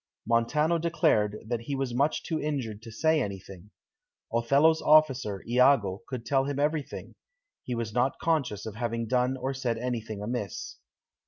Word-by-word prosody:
Montano 150 +9 +2
declared 155 - +1
that 120 +1 -2
he 130 +5 -4
was 135 -2 -2
too - - -5
much 140 +4 +1
injured 140 -9 -2
to 115 - -10
say 160 +6 +2
anything; 100 -2 -7 0.6
Othello's 140 +7 +3
officer, 135 -10 +3
Iago, 120 -5 +3
could 125 -3 -6
tell 135 -1 +2
him 140 0 -3
everything; 150 +1 -2 0.5
he 125 - -3
was 115 -2 -4
not 125 +3 +1
conscious 140 -11 -1
of 110 - -5
having 115 0 -2
done 125 +2 +1
or 130 +1 -2
said 125 -4 -2
anything 115 -3 -4
amiss. 105 -4 -4
125 Hz, 155 wpm, -28 LUFS, 115-145 Hz, 0.6 s, Othello's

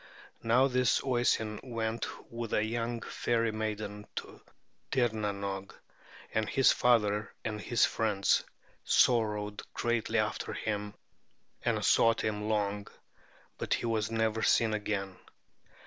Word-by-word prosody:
Now 120 +4 +4
this 125 -2 +2
Oisin 120 -4 +1
went 115 -2 -3 0.2
with 115 -1 -5
a 105 - +2
young 115 +1 -2
fairy 115 -1 0
maiden 105 -1 -4
to - - -7 0.5
Tirnanoge, 100 -6 -1 0.6
and 110 -1 0
his 135 - +5
father 105 -4 +2
and 105 -1 -3
his 120 +2 +3
friends 105 -3 +1 0.4
sorrowed 105 -3 +2
greatly 120 -1 0
after 110 -1 -1
him 105 -1 -3 0.7
and - - 0
sought 115 0 +4
him 105 0 -2
long; 105 -1 -1 0.7
but - - +1
he - - -4
was 110 -2 0
never 110 -1 0
seen 110 -1 +3
again." 100 -3 -2
110 Hz, 115 wpm, -31 LUFS, 105-115 Hz, 0.7 s, his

